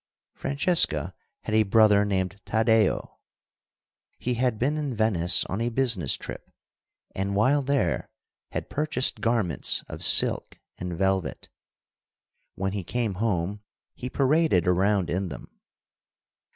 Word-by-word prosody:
Francesca 135 Hz, -, +1 dB, 0.3 s
had -, -, -5 dB
a 110 Hz, -, +4 dB
brother 105 Hz, 0 st, +4 dB
named 100 Hz, 0 st, -2 dB
Taddeo. 110 Hz, -1 st, 0 dB, 1.0 s
He 125 Hz, -, -2 dB
had 120 Hz, -1 st, -1 dB
been 135 Hz, +7 st, 0 dB
in 145 Hz, -5 st, -3 dB
Venice 95 Hz, -5 st, +3 dB
on 100 Hz, +4 st, -4 dB
a 120 Hz, -, 0 dB
business 115 Hz, -, +1 dB
trip, -, -, -9 dB, 0.6 s
and, 100 Hz, +1 st, -3 dB
while 130 Hz, +8 st, +2 dB
there, 140 Hz, 0 st, -1 dB, 0.4 s
had -, -, -5 dB
purchased 150 Hz, -3 st, 0 dB
garments 115 Hz, -, +1 dB
of -, -, -6 dB
silk -, -, +4 dB, 0.2 s
and 90 Hz, -1 st, -5 dB
velvet. 95 Hz, -1 st, -2 dB, 1.1 s
When 95 Hz, 0 st, -2 dB
he 100 Hz, -1 st, -4 dB
came 115 Hz, +2 st, -2 dB
home 100 Hz, -2 st, -2 dB, 0.3 s
he 125 Hz, -, -7 dB
paraded 140 Hz, -, +2 dB
around 95 Hz, +1 st, +1 dB
in 90 Hz, +1 st, -2 dB
them. 75 Hz, -, -12 dB
105 Hz, 125 wpm, -25 LUFS, 95-125 Hz, 1.1 s, a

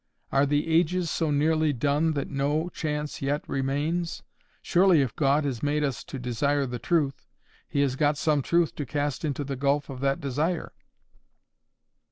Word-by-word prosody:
Are 140 Hz, +1 st, +3 dB
the 145 Hz, +2 st, +1 dB
ages 170 Hz, +1 st, +2 dB
so 165 Hz, -2 st, 0 dB
nearly 155 Hz, +1 st, +2 dB
done 145 Hz, +5 st, +1 dB
that 140 Hz, -2 st, -2 dB
no 145 Hz, +5 st, -1 dB
chance 150 Hz, -3 st, -4 dB
yet 145 Hz, +2 st, -1 dB
remains? 145 Hz, +6 st, -1 dB, 0.4 s
Surely 180 Hz, -3 st, +4 dB
if 120 Hz, -5 st, -4 dB
God 145 Hz, +1 st, +2 dB
has 125 Hz, -5 st, -2 dB
made 150 Hz, +1 st, +1 dB
us 135 Hz, -5 st, -2 dB
to -, -, -7 dB
desire 135 Hz, +3 st, 0 dB
the 125 Hz, -1 st, -5 dB
truth, 140 Hz, -1 st, 0 dB, 0.4 s
He 140 Hz, -, +1 dB
has 135 Hz, -2 st, +1 dB
got 145 Hz, +1 st, +2 dB
some 150 Hz, -1 st, +2 dB
truth 170 Hz, +4 st, +1 dB
to 145 Hz, -, -3 dB
cast 145 Hz, 0 st, -2 dB
into 145 Hz, -2 st, -1 dB
the 140 Hz, 0 st, -4 dB
gulf 140 Hz, +2 st, 0 dB
of 130 Hz, -, -7 dB
that 135 Hz, +2 st, 0 dB
desire. 155 Hz, +4 st, -1 dB
145 Hz, 170 wpm, -27 LUFS, 140-155 Hz, 0.4 s, Surely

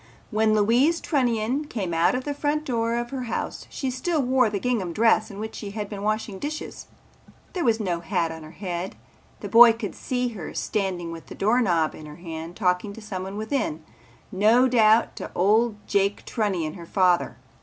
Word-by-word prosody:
When 215 Hz, 0 st, +3 dB
Louise 245 Hz, +11 st, +3 dB
Trunnion 250 Hz, -1 st, 0 dB
came 195 Hz, -, -4 dB
out 165 Hz, +7 st, +3 dB
of 255 Hz, -, -2 dB
the 290 Hz, -, -3 dB
front 295 Hz, +1 st, -1 dB
door 230 Hz, -3 st, 0 dB
of 240 Hz, 0 st, -3 dB
her 260 Hz, -2 st, -4 dB
house 230 Hz, -, -4 dB
she 265 Hz, -2 st, -3 dB
still 305 Hz, +6 st, -1 dB
wore 255 Hz, -3 st, +3 dB
the 205 Hz, -1 st, -2 dB
gingham 205 Hz, -7 st, -1 dB
dress 220 Hz, +2 st, +3 dB
in 200 Hz, -, -9 dB
which 220 Hz, +1 st, -5 dB
she 205 Hz, -, -6 dB
had 205 Hz, -1 st, -3 dB
been 205 Hz, -2 st, -6 dB
washing 215 Hz, -1 st, -2 dB
dishes. 305 Hz, +5 st, -6 dB, 0.7 s
There 360 Hz, -, -1 dB
was 230 Hz, -2 st, +2 dB
no 180 Hz, -5 st, -1 dB
hat 170 Hz, -1 st, -1 dB
on 160 Hz, 0 st, -8 dB
her 155 Hz, -, -10 dB
head. 180 Hz, -1 st, -4 dB, 0.5 s
The -, -, -4 dB
boy 235 Hz, 0 st, +8 dB
could 225 Hz, -4 st, -5 dB
see 250 Hz, -1 st, -2 dB
her 200 Hz, -9 st, -8 dB
standing 185 Hz, -5 st, -2 dB
with 165 Hz, -1 st, -9 dB
the -, -, -9 dB
doorknob 195 Hz, -7 st, +2 dB
in 155 Hz, -, -10 dB
her 150 Hz, -, -10 dB
hand 165 Hz, 0 st, -7 dB
talking 185 Hz, 0 st, 0 dB
to 225 Hz, -, -10 dB
someone 195 Hz, -1 st, -5 dB
within, 215 Hz, -, -2 dB, 0.5 s
no 220 Hz, +7 st, +4 dB
doubt 225 Hz, -2 st, +4 dB
to -, -, -5 dB
old 215 Hz, +4 st, +3 dB
Jake 200 Hz, 0 st, 0 dB
Trunnion, 185 Hz, -9 st, -1 dB
her 170 Hz, -3 st, -10 dB
father. 180 Hz, -2 st, +2 dB
215 Hz, 190 wpm, -25 LUFS, 185-240 Hz, 0.7 s, boy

